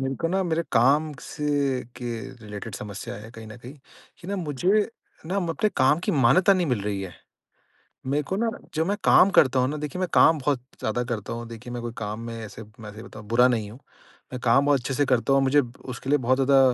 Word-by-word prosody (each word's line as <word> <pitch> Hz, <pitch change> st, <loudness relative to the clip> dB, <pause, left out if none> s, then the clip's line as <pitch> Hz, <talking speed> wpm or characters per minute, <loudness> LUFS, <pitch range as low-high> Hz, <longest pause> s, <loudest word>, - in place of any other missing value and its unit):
मेरे 135 Hz, 0 st, -2 dB
को 165 Hz, -, 0 dB
ना 190 Hz, +2 st, +1 dB
मेरे 170 Hz, -2 st, 0 dB
काम 140 Hz, +6 st, +3 dB
से 145 Hz, -3 st, -1 dB
के 125 Hz, -, -6 dB, 0.4 s
रिलेटेड 105 Hz, 0 st, -7 dB
समस्या 100 Hz, -1 st, -7 dB
है 105 Hz, +2 st, -10 dB
कहीं 115 Hz, -1 st, -11 dB
न 110 Hz, +1 st, -10 dB
कहीं 125 Hz, +4 st, -11 dB, 0.5 s
कि 175 Hz, -, -11 dB
ना 200 Hz, -, -2 dB
मुझे 180 Hz, +5 st, +1 dB, 0.4 s
ना 185 Hz, -, -2 dB
अपने 180 Hz, +2 st, 0 dB
काम 135 Hz, +4 st, +4 dB
की -, -, +2 dB
मान्यता 165 Hz, -, +5 dB
नहीं 180 Hz, -2 st, 0 dB
मिल 125 Hz, -7 st, 0 dB
रही 100 Hz, -1 st, -2 dB
है। 95 Hz, -2 st, -7 dB, 0.9 s
मेरे 145 Hz, +3 st, 0 dB
को 190 Hz, -, 0 dB
ना 230 Hz, +2 st, 0 dB, 0.2 s
जब 160 Hz, +1 st, 0 dB
मैं 200 Hz, +2 st, 0 dB
काम 195 Hz, -, +6 dB
करता 130 Hz, -1 st, +5 dB
हूँ 125 Hz, -, +2 dB
ना 150 Hz, -, -3 dB
देखिए 150 Hz, +4 st, -5 dB
मैं 185 Hz, -, 0 dB
काम 160 Hz, -1 st, +6 dB
बहुत 140 Hz, -2 st, 0 dB, 0.2 s
ज़्यादा 115 Hz, +3 st, -1 dB
करता 115 Hz, -3 st, -4 dB
हूँ। 120 Hz, 0 st, -5 dB
देखिए, 115 Hz, +1 st, -9 dB
मैं 120 Hz, -, -5 dB
कोई 120 Hz, -1 st, -5 dB
काम 105 Hz, 0 st, -4 dB
में 115 Hz, 0 st, -6 dB
ऐसे 110 Hz, -, -9 dB, 0.2 s
मैं 105 Hz, -2 st, -9 dB
सही 110 Hz, -, -10 dB
बताऊँ 110 Hz, -1 st, -11 dB
बुरा 125 Hz, +2 st, +6 dB
नहीं 110 Hz, -4 st, -1 dB
हूँ। 115 Hz, -, -12 dB, 0.5 s
मैं 125 Hz, -, -4 dB
काम 130 Hz, +4 st, +3 dB
बहुत 145 Hz, -2 st, +3 dB
अच्छे 130 Hz, +2 st, -3 dB
से 145 Hz, -, +2 dB
करता 130 Hz, +1 st, +2 dB
हूँ -, -, +5 dB
और -, -, +1 dB
मुझे 145 Hz, +2 st, +4 dB, 0.3 s
उसके 125 Hz, +1 st, -7 dB
लिए 145 Hz, -, +4 dB
बहुत 130 Hz, +2 st, +3 dB
ज़्यादा 135 Hz, 0 st, +4 dB
130 Hz, 235 wpm, -25 LUFS, 115-150 Hz, 0.9 s, काम